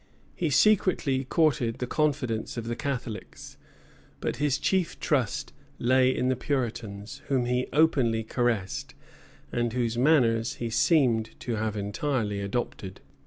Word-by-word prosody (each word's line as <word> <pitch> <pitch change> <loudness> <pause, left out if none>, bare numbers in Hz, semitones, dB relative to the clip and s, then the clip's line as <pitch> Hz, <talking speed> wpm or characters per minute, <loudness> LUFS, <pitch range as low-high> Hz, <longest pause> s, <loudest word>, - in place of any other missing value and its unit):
He 170 - -1
secretly 150 -7 +3
courted 130 -6 +1
the 125 - -2
confidence 130 -6 -1
of 115 - -3
the 120 - -2
Catholics; 130 -5 -5 0.6
but - - -2
his 145 -2 +1
chief 185 +3 0
trust 130 -9 -1 0.2
lay 130 +1 +3
in 130 -1 0
the 130 - +2
Puritans, 115 -6 -3
whom 130 -3 +1
he 125 +1 0
openly 130 -7 +3
caressed, 110 -4 -1 0.6
and 120 -1 -1
whose 120 -2 -1
manners 120 -5 +3
he 115 -1 -4
seemed 125 -4 +2
to 120 -3 -2
have 110 0 -2
entirely 105 0 -1
adopted. 100 -2 -4
125 Hz, 130 wpm, -27 LUFS, 115-140 Hz, 0.6 s, secretly